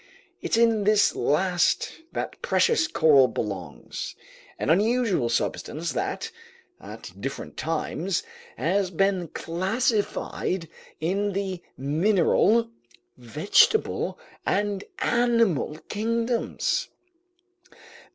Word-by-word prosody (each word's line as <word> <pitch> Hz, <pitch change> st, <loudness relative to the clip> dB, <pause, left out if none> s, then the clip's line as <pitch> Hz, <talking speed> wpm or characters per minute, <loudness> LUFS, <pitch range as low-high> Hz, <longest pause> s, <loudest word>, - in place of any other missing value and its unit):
It's -, -, 0 dB
in 230 Hz, -2 st, +3 dB
this 210 Hz, 0 st, +4 dB
last 175 Hz, +7 st, +1 dB, 0.2 s
that -, -, -5 dB
precious 450 Hz, -9 st, +2 dB
coral 150 Hz, -, +5 dB
belongs, 110 Hz, -2 st, -5 dB, 0.4 s
an -, -, 0 dB
unusual 205 Hz, -, +2 dB
substance 155 Hz, +6 st, -2 dB
that, 130 Hz, -, -3 dB, 0.5 s
at -, -, -10 dB
different 135 Hz, +3 st, -5 dB
times, 165 Hz, +3 st, -2 dB, 0.3 s
has 190 Hz, +3 st, +1 dB
been 190 Hz, 0 st, +1 dB
classified 190 Hz, -, -1 dB, 0.3 s
in 195 Hz, +6 st, 0 dB
the 190 Hz, -2 st, -3 dB, 0.2 s
mineral, 195 Hz, -, +2 dB, 0.4 s
vegetable, 150 Hz, -, +2 dB, 0.3 s
and 205 Hz, -1 st, 0 dB, 0.2 s
animal 230 Hz, -, +2 dB
kingdoms. 230 Hz, +2 st, -1 dB
195 Hz, 85 wpm, -25 LUFS, 160-225 Hz, 0.5 s, coral